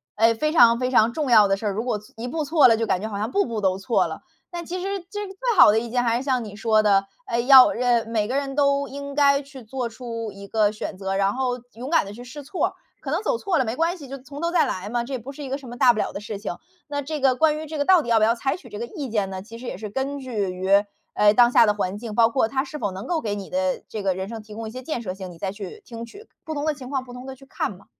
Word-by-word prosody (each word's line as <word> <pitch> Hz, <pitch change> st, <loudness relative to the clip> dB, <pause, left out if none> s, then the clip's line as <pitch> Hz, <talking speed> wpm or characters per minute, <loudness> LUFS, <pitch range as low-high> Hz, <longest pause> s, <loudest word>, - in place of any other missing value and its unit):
哎， 225 Hz, +2 st, +4 dB
非 305 Hz, +7 st, -1 dB
常 235 Hz, -8 st, +6 dB
非 255 Hz, 0 st, -1 dB
常 235 Hz, -2 st, +4 dB
重 300 Hz, -2 st, -2 dB
要 215 Hz, -3 st, +7 dB
的 195 Hz, -, +2 dB
事 210 Hz, +2 st, -4 dB
儿， -, -, +1 dB
如 210 Hz, +3 st, -2 dB
果 245 Hz, -4 st, 0 dB
错 210 Hz, -, -19 dB
一 235 Hz, +2 st, -5 dB
步 310 Hz, +5 st, -2 dB
错 295 Hz, 0 st, +5 dB
了， 230 Hz, -, +5 dB
就 225 Hz, 0 st, -1 dB
感 185 Hz, -, +1 dB
觉 215 Hz, -, -3 dB
好 205 Hz, -, -4 dB
像 215 Hz, +4 st, -2 dB
步 400 Hz, -, +2 dB
步 230 Hz, -3 st, -4 dB
都 190 Hz, -1 st, +1 dB
错 210 Hz, +5 st, +1 dB
了。 -, -, -7 dB, 0.3 s
但 345 Hz, -1 st, -5 dB
其 360 Hz, +3 st, -4 dB
实 395 Hz, +1 st, -2 dB
这 415 Hz, -1 st, -4 dB
个 385 Hz, -, -10 dB
最 465 Hz, +2 st, -1 dB
好 -, -, +9 dB
的 220 Hz, -, +3 dB
一 235 Hz, +1 st, -6 dB
件， 245 Hz, +1 st, +1 dB
还 235 Hz, -1 st, +2 dB
是 250 Hz, -, -4 dB
像 260 Hz, -3 st, 0 dB
你 210 Hz, -2 st, -9 dB
说 215 Hz, 0 st, +3 dB
的 195 Hz, -2 st, +4 dB, 0.2 s
哎， 235 Hz, -, -1 dB
要， 260 Hz, +1 st, +8 dB
人 245 Hz, +1 st, -1 dB
呃， -, -, -17 dB
每 215 Hz, -2 st, 0 dB
个 255 Hz, -, -2 dB
人 275 Hz, -1 st, -2 dB
都 280 Hz, -1 st, +2 dB
应 280 Hz, 0 st, -7 dB
该 280 Hz, -1 st, +4 dB
去 275 Hz, -2 st, -12 dB
做 245 Hz, +2 st, -3 dB
出 230 Hz, -1 st, -6 dB
一 200 Hz, 0 st, -10 dB
个 210 Hz, 0 st, +2 dB
选 210 Hz, -2 st, -6 dB
择， 195 Hz, 0 st, -3 dB
然 195 Hz, +1 st, +2 dB
后 250 Hz, -1 st, -1 dB
勇 245 Hz, +4 st, -7 dB
敢 330 Hz, -, +4 dB
地 200 Hz, -, -8 dB
去 240 Hz, +3 st, -10 dB
试 275 Hz, +4 st, -9 dB
错， 305 Hz, +7 st, -1 dB, 0.3 s
可 275 Hz, -, -6 dB
能 325 Hz, +5 st, 0 dB
走 465 Hz, +2 st, 0 dB
错 385 Hz, -8 st, 0 dB
了 -, -, +3 dB
没 225 Hz, 0 st, -3 dB
关 330 Hz, +5 st, +1 dB
系， 295 Hz, -7 st, -11 dB
就 275 Hz, +1 st, -7 dB
从 280 Hz, +3 st, -10 dB
头 335 Hz, -, 0 dB
再 340 Hz, -1 st, +3 dB
来 190 Hz, +2 st, -4 dB
嘛， 240 Hz, +1 st, -1 dB
这 260 Hz, +3 st, -7 dB
也 260 Hz, -, -2 dB
不 250 Hz, +4 st, -8 dB
是 290 Hz, +1 st, -9 dB
一 270 Hz, -, -6 dB
个 270 Hz, +2 st, -2 dB
什 265 Hz, -3 st, -11 dB
么 240 Hz, -, -8 dB
大 255 Hz, -2 st, +6 dB
不 215 Hz, -, -4 dB
了 -, -, -1 dB
的 -, -, -4 dB
事 210 Hz, -1 st, -6 dB
情。 200 Hz, -4 st, -5 dB, 0.3 s
那 285 Hz, -1 st, -3 dB
这 305 Hz, +2 st, -4 dB
个 265 Hz, -1 st, +4 dB
关 305 Hz, +3 st, +2 dB
于 315 Hz, -, -7 dB
这 310 Hz, +1 st, -5 dB
个 285 Hz, -, 0 dB
到 370 Hz, 0 st, +6 dB
底 240 Hz, -, -7 dB
要 230 Hz, -, +4 dB
不 215 Hz, -, +3 dB
要 225 Hz, +2 st, +4 dB
采 270 Hz, +5 st, -2 dB
取 280 Hz, -9 st, -15 dB
这 210 Hz, -1 st, -7 dB
个 235 Hz, -, -4 dB
意 290 Hz, -6 st, -6 dB
见 210 Hz, -3 st, 0 dB
呢？ 190 Hz, -1 st, -6 dB
其 230 Hz, +2 st, -11 dB
实 250 Hz, -, -8 dB
也 -, -, -4 dB
是 210 Hz, +1 st, -7 dB
根 270 Hz, +4 st, -2 dB
据 235 Hz, -8 st, -3 dB
于， 190 Hz, +2 st, +3 dB, 0.3 s
哎， 210 Hz, 0 st, +5 dB
当 240 Hz, +1 st, +5 dB
下 230 Hz, -, +6 dB
的 210 Hz, -, +2 dB
环 200 Hz, 0 st, -2 dB
境， 220 Hz, -2 st, -6 dB
包 230 Hz, 0 st, +5 dB
括 235 Hz, -1 st, +1 dB
它 265 Hz, +3 st, -1 dB
是 295 Hz, +2 st, -8 dB
否 205 Hz, -, -1 dB
能 190 Hz, +2 st, -7 dB
够 335 Hz, -3 st, -1 dB
给 205 Hz, -2 st, -2 dB
你 200 Hz, -2 st, -8 dB
的 275 Hz, -1 st, -1 dB
这 215 Hz, -, -5 dB
个 190 Hz, -2 st, 0 dB
人 190 Hz, +1 st, -4 dB
生 225 Hz, -1 st, -6 dB
提 210 Hz, 0 st, -12 dB
供 225 Hz, 0 st, -5 dB
一 -, -, -7 dB
些 255 Hz, +2 st, -7 dB
建 255 Hz, -3 st, -4 dB
设 185 Hz, -4 st, -4 dB
性， 190 Hz, -1 st, -8 dB
你 170 Hz, -, -13 dB
再 190 Hz, +3 st, -3 dB
去 200 Hz, -2 st, -9 dB
听 230 Hz, -1 st, -7 dB
取。 415 Hz, -, -14 dB, 0.2 s
不 315 Hz, -2 st, -5 dB
同 290 Hz, +1 st, -2 dB
的 310 Hz, -, +1 dB
情 260 Hz, -3 st, -10 dB
况 265 Hz, -2 st, -1 dB
不 250 Hz, -1 st, -12 dB
同 250 Hz, +1 st, -9 dB
地 265 Hz, -, -7 dB
去 270 Hz, +1 st, -17 dB
看 270 Hz, -, -3 dB
嘛， 195 Hz, -, -20 dB
245 Hz, 355 characters per minute, -24 LUFS, 215-280 Hz, 0.3 s, 好